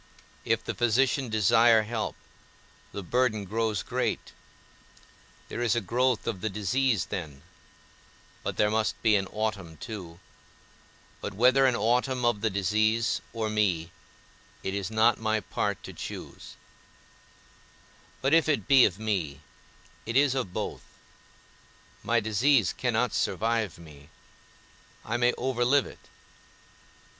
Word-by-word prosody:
If - - +1
the - - -3
physician 125 +2 +1
desire 110 +1 +4
help, 110 0 -3 0.8
the 100 - -6
burden 110 +1 0
grows 110 0 -1
great: - - -2 1.1
there - - -5
is 120 -1 +2
a - - +2
growth 120 +4 0
of 110 -6 -3
the 110 - -1
disease 110 +3 0
then; 75 -8 -6 1.0
but - - -4
there 105 0 +3
must 110 0 0
be 110 -2 +5
an 95 -1 0
autumn 105 -7 -4
too; 90 -5 -8 1.0
but 105 - -5
whether 130 +5 +5
an 125 - +2
autumn 125 +3 +1
of 120 -4 +1
the 110 - +1
disease 110 +4 +1
or 110 -1 -2
me, 95 -6 0 0.7
it 95 - -3
is 100 -1 -3
not 110 +1 +3
my 110 0 0
part 105 - -3
to - - -8
choose; - - -8 1.7
but 135 +3 +1
if 165 -1 +4
it 145 - 0
be 135 -3 +7
of 95 -3 -1
me, 90 -10 -2 0.7
it 115 +3 0
is 140 -1 +4
of 125 -9 -2
both; - - -4 1.2
my 120 0 +2
disease 110 - +2
cannot - - 0
survive 110 -4 -1
me, 75 -3 -15 1.0
I 115 +2 -1
may 120 0 +3
overlive 130 +2 +1
it. - - -14
110 Hz, 130 wpm, -27 LUFS, 100-120 Hz, 1.7 s, be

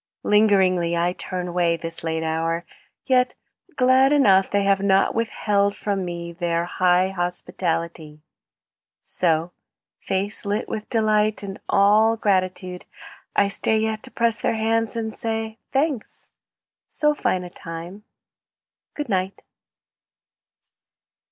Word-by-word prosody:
Lingeringly 190 -5 +3
I 175 +1 +1
turn 180 -1 -5
away, 170 -1 +1
This 165 0 -6
late 160 0 -2
hour, 165 +1 -1 0.4
yet 250 -1 +2 0.4
glad 260 +1 +4
enough 195 -10 +4
They 200 0 +1
have 195 0 +3
not 195 -1 +3
withheld 205 -3 0
from 200 -2 -2
me 170 -1 -5
Their 170 -1 -1
high 180 +1 +2
hospitality. 170 -4 -3 0.8
So, 165 -1 0 0.5
with - - -30
face 195 +2 -2
lit 205 +1 -2
with 215 -1 -5
delight 215 -2 +1
And 195 -1 -7
all 215 +3 +4
gratitude, 185 -3 -1 0.5
I 200 - +4
stay 220 +2 0
Yet 220 0 -1
to 260 - -9
press 235 -2 0
their - - +1
hands 225 0 0
and 220 -1 -3
say, 225 0 -3
"Thanks. 275 -4 -2 0.6
So 300 0 +1
fine 185 -10 -1
a 180 - -9
time! 170 +5 -8 0.9
Good 295 -1 -4
night. 190 -2 -2
195 Hz, 125 wpm, -23 LUFS, 175-220 Hz, 0.9 s, glad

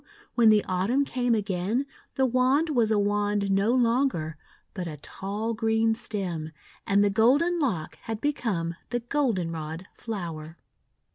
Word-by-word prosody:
when 235 -2 +5
the 215 -1 +4
Autumn 200 +10 +1
came 245 -3 +1
again 205 +5 -1 0.3
the 265 - +3
wand 260 +6 +2
was 235 -6 +2
a 215 - +3
wand 205 0 +1
no 195 +4 +3
longer, 240 - +1 0.4
but 185 -4 -4
a 155 -2 -6
tall 205 +9 -4
green 225 0 +2
stem; 180 -8 -4 0.4
and 200 +1 +4
the 205 - +3
golden 285 - +3
lock 205 - -1
had 225 -1 -3
become 220 - -1 0.2
the 240 0 -1
Goldenrod 180 - -2
flower. 170 -7 -6
215 Hz, 140 wpm, -27 LUFS, 185-245 Hz, 0.4 s, when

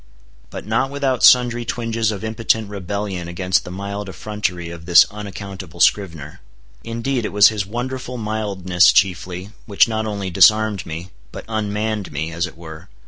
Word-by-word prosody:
But - - -8
not 135 - 0
without 135 -3 -1
sundry 120 -1 +5
twinges 115 -2 -1
of 105 0 -6
impotent 110 -1 -1
rebellion 100 -2 -4
against 90 +1 0
the - - -7
mild 100 +2 -5
effrontery 90 -1 -4
of 85 -1 -10
this 85 - +8
unaccountable 100 -4 -8
scrivener. 80 -5 +1 0.4
Indeed, 115 +2 -2
it - - -3
was 100 0 +7
his 105 -3 -3
wonderful 125 +3 -5
mildness 100 -5 +2
chiefly, 90 0 0 0.2
which 100 -2 +4
not 110 -1 -2
only 100 -3 -4
disarmed 110 +2 +4
me, 85 +4 -7 0.2
but - - -9
unmanned 110 -1 -2
me, 80 +3 -3
as 85 +2 -2
it 80 - -14
were. 80 +1 -11
100 Hz, 155 wpm, -20 LUFS, 90-110 Hz, 0.4 s, this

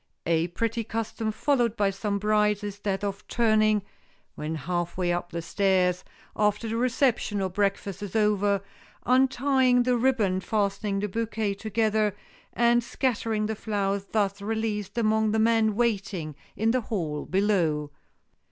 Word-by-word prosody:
A 165 0 +2
pretty 230 +6 -2
custom 225 0 -3
followed 240 -1 +1
by 200 -1 +2
some 200 +1 -2
brides 210 0 +2
is 205 -1 -5
that 200 -1 -2
of 200 -1 -4
turning, 215 -3 +3 0.5
when 155 +2 -4
half 175 +4 -3
way 175 -1 +1
up 175 0 -3
the 170 -1 -4
stairs, 180 0 +1 0.3
after 210 +2 +1
the 225 - -2
reception 240 -3 +1
or 190 -1 -1
breakfast 200 0 -1
is 205 -1 -6
over, 205 -2 +2 0.4
untying 255 0 +3
the 250 0 +2
ribbon 230 -7 +2
fastening 200 -1 -1
the 210 - -1
bouquet 220 0 -2
together, 215 0 0 0.4
and 240 0 +3
scattering 225 -4 -1
the 220 - -1
flowers 200 -2 -2
thus 200 -1 -1
released 220 0 -3
among 220 -1 +2
the - - +2
men 220 -1 +3
waiting 195 -9 -1 0.2
in 225 +1 +1
the 255 +1 +1
hall 165 -10 -3
below. 175 -7 +1
210 Hz, 145 wpm, -26 LUFS, 195-225 Hz, 0.5 s, turning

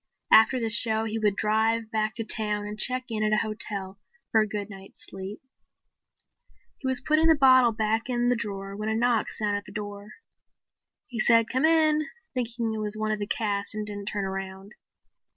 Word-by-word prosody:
After 225 +4 +6
the 225 -2 -1
show 220 0 +4
he 225 0 -2
would 210 -2 +1
drive 220 +1 0
back 215 0 -1
to 225 - -2
town 210 -2 -1
and 210 0 -5
check 255 +3 +1
in 220 -2 -2
at 215 0 +1
a 215 - +2
hotel 200 -3 -3 0.3
for 220 - +4
a 215 - 0
good 205 -1 -4
night's 195 -1 -9
sleep. 195 +2 -8 1.4
He 265 - -4
was 260 -1 +1
putting 310 +1 +3
the 320 - +6
bottle 260 -4 +6
back 220 +2 -1
in 240 -1 0
the 245 - +3
drawer 195 -3 -5
when 215 +1 -3
a 220 - 0
knock 235 -1 +1
sounded 205 -1 -1
on 205 - -6
the - - -11
door. 205 0 -7 0.9
He 240 -3 -7
said 230 0 +4
"Come 260 +3 +1
in," 310 -1 +3 0.3
thinking 235 -2 -2
it 220 - -4
was 210 0 -3
one 215 0 -1
of 215 - -1
the 205 - -3
cast 205 -2 -1
and 215 0 -3
didn't 205 -1 -5
turn 205 -2 -1
around. 195 +2 -6
215 Hz, 200 wpm, -26 LUFS, 205-235 Hz, 1.4 s, After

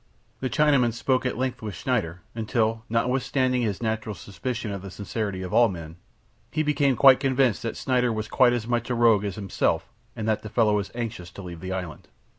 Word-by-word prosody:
The 130 - -2
Chinaman 125 -2 +3
spoke 130 +2 +1
at - - -3
length 125 -1 -2
with 105 -4 -5
Schneider, 90 -5 -1
until, 115 0 0
notwithstanding 125 +2 +1
his 110 -1 -2
natural 110 -1 -2
suspicion 110 +4 -5
of 100 -1 -5
the 100 - -8
sincerity 100 -1 -4
of 90 - -6
all 120 -1 +6
men, 85 -3 -7 0.5
he 155 - 0
became 145 -3 +2
quite 135 +1 +7
convinced 130 -4 +2
that 115 - -4
Schneider 125 -2 +1
was 110 -1 -3
quite 125 +2 +4
as 120 -3 -2
much 120 +1 -1
a 125 - 0
rogue 115 -3 +4
as 100 -2 -3
himself 100 -3 -1 0.2
and 110 - -4
that 110 -1 +1
the 110 - -7
fellow 105 -2 +3
was 100 -2 -3
anxious 115 -7 -5
to 95 +3 -10
leave 85 -2 -8
the 95 +2 -6
island. 90 -4 -5
115 Hz, 205 wpm, -25 LUFS, 100-125 Hz, 0.5 s, quite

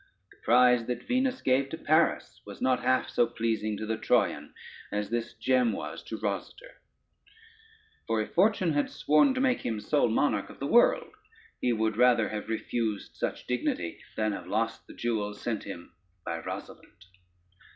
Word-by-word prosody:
The - - -20
prize 125 0 +4
that 125 - -3
Venus 255 0 0
gave 135 +1 +2
to 160 - -5
Paris 160 +1 +1
was - - -10
not 130 -1 +1
half 130 +1 +2
so 120 - +2
pleasing 110 -2 -2
to 110 - -4
the 110 0 -2
Troyan - - +1 0.4
as 105 0 -2
this 120 0 -2
gem 125 -3 +2
was - - -6
to - - -5
Rosader; - - -5 1.3
for 115 -1 +1
if 110 - -4
fortune 185 -3 +3
had 145 0 +1
sworn 205 - +3
to - - -1
make 255 -1 +2
him 110 -2 -2
sole 145 +3 +1
monarch 130 +6 +1
of - - -13
the 140 - -3
world, 240 - +3 0.5
he 125 - +2
would 110 -1 0
rather 120 -2 +4
have 105 0 -5
refused 110 -1 -2
such - - -3
dignity, 90 -8 -2 0.2
than 110 0 0
have 90 -3 -6
lost 110 +4 -2
the - - -12
jewel 105 -3 -2
sent 110 0 -4
him 85 -4 -9 0.3
by 85 0 -3
Rosalynde. - - -9
120 Hz, 170 wpm, -28 LUFS, 110-145 Hz, 1.3 s, prize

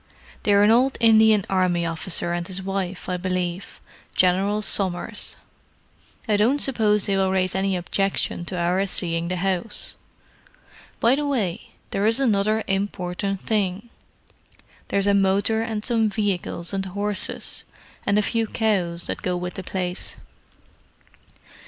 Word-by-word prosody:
"They're 205 -1 +4
an 210 - +6
old 255 +4 +3
Indian 220 -3 +5
Army 180 -2 +1
officer 170 +1 -1
and 175 0 -3
his 190 0 -3
wife, 195 -1 -3
I 180 - -1
believe; 180 0 -3 0.4
General 195 +3 +2
Somers. 195 +2 0 0.9
I 210 -2 +3
don't 235 +7 +3
suppose 220 -7 +2
they 200 - +1
will 190 -1 +2
raise 185 -1 +1
any 195 0 0
objection 185 0 -1
to 180 - -4
our 180 +3 +1
seeing 170 -2 0
the 180 - -2
house. 190 +3 -2 1.0
By 235 +2 +4
the 290 +1 0
way, 215 -11 -2 0.2
there 200 +2 +1
is 225 +3 +3
another 215 -3 +2
important 195 0 -2
thing: 205 0 -1 1.0
there's 200 0 +1
a 200 - +4
motor 200 +3 +2
and 220 -2 -3
some 225 -3 +2
vehicles 195 -4 -1
and 195 0 -1
horses, 200 +1 -2 0.4
and 200 - +2
a 210 - +3
few 225 +1 0
cows, 185 -7 0
that - - -4
go 180 -1 -1
with 180 0 -4
the - - -6
place. 180 -1 -4
195 Hz, 140 wpm, -23 LUFS, 180-215 Hz, 1.0 s, an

